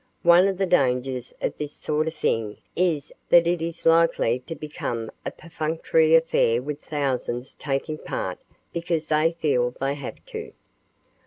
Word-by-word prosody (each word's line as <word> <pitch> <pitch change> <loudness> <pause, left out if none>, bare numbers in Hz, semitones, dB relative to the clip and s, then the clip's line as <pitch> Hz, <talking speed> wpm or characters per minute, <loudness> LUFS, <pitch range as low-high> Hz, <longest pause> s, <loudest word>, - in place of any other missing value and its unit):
One 175 +2 +7
of 195 -2 -1
the 195 - +1
dangers 130 -6 +1
of - - 0
this 150 -1 -4
sort 155 +1 -1
of 160 - -3
thing 110 -7 -1 0.2
is 165 -5 0 0.2
that 170 -1 +7
it 170 -1 +1
is 165 0 -5
likely 165 -7 +4
to 165 - -4
become 120 -7 -4 0.2
a - - +1
perfunctory 160 0 +1
affair 160 -8 +3
with 145 +3 -5
thousands 130 -3 -2
taking 150 +2 -3
part - - -4 0.3
because 170 -2 -2
they 155 +2 +3
feel 125 -6 +2
they 135 +1 0
have 145 - -6 0.2
to. 445 0 -6
155 Hz, 155 wpm, -25 LUFS, 135-165 Hz, 0.3 s, One